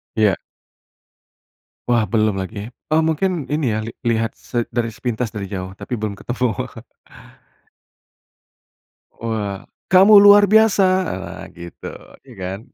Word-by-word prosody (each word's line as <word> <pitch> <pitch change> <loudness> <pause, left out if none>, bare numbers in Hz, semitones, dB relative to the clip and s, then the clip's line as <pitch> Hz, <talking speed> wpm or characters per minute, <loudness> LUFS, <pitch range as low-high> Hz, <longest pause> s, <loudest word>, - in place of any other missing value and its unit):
Iya. 105 -4 +3 1.5
Wah, 120 -2 +3
belum 110 -2 +2
lagi. 100 +2 -5 0.2
Oh, 155 - +4
mungkin 160 -1 0
ini, 150 +1 -1
ya, 110 - -1
li 110 +1 -7
lihat 115 -1 0
se 120 -1 -4
dari 115 -1 0
sepintas 120 -1 -3
dari 100 -2 -4
jauh 95 -1 -5
tapi 125 - -4
belum 105 -3 -5
ketemu. 120 -3 -3 2.3
Wah, 105 -4 -4 0.2
"Kamu 195 +3 +7
luar 205 0 +8
biasa!" 220 -2 +5 0.2
Ah, - - -6
gitu, 85 0 -10 0.4
ya, 130 - -13
kan. 95 +1 -5
115 Hz, 120 wpm, -20 LUFS, 105-150 Hz, 2.3 s, luar